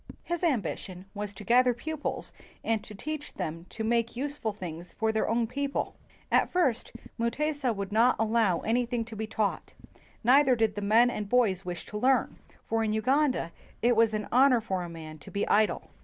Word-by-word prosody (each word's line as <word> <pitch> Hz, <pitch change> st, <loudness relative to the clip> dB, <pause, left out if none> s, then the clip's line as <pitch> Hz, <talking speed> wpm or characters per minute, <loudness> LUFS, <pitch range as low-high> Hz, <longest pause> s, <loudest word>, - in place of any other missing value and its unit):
His 345 Hz, 0 st, -3 dB
ambition 195 Hz, -, -2 dB
was 205 Hz, -1 st, -4 dB
to 200 Hz, -, -10 dB
gather 245 Hz, +2 st, +4 dB
pupils 310 Hz, +5 st, -4 dB, 0.3 s
and 225 Hz, -2 st, 0 dB
to 210 Hz, -, -11 dB
teach 305 Hz, +7 st, -6 dB
them 165 Hz, +2 st, -5 dB
to 220 Hz, -, -5 dB
make 235 Hz, +1 st, +1 dB
useful 280 Hz, -4 st, -2 dB
things 175 Hz, -4 st, -8 dB
for 220 Hz, 0 st, 0 dB
their 220 Hz, -, 0 dB
own 230 Hz, +1 st, +2 dB
people. 280 Hz, +4 st, -3 dB, 0.4 s
At -, -, +4 dB
first 310 Hz, -11 st, +1 dB, 0.3 s
Mutesa 280 Hz, +3 st, 0 dB
would 200 Hz, -2 st, -4 dB
not 230 Hz, +4 st, +4 dB
allow 220 Hz, -5 st, +2 dB
any 240 Hz, +3 st, +1 dB
one 235 Hz, -2 st, -2 dB
to 225 Hz, -1 st, -9 dB
be 220 Hz, +1 st, -4 dB
taught, 215 Hz, -2 st, -2 dB, 0.5 s
neither 260 Hz, +2 st, +5 dB
did 225 Hz, -2 st, +1 dB
the 205 Hz, -, -5 dB
men 225 Hz, +4 st, +4 dB
and 210 Hz, -4 st, -4 dB
boys 205 Hz, -7 st, +2 dB
wish 175 Hz, -1 st, -5 dB
to 210 Hz, -, -5 dB
learn, 260 Hz, +3 st, +2 dB, 0.3 s
for 225 Hz, 0 st, 0 dB
in 215 Hz, -1 st, 0 dB
Uganda 260 Hz, -, +1 dB, 0.3 s
it 240 Hz, 0 st, +4 dB
was 225 Hz, -1 st, +3 dB
an 210 Hz, -1 st, -3 dB
honor 255 Hz, 0 st, +5 dB
for 190 Hz, -5 st, -2 dB
a 175 Hz, -, -5 dB
man 155 Hz, -2 st, -9 dB
to -, -, -12 dB
be 200 Hz, -, -2 dB
idle. 215 Hz, +1 st, +2 dB
225 Hz, 190 wpm, -28 LUFS, 205-250 Hz, 0.5 s, neither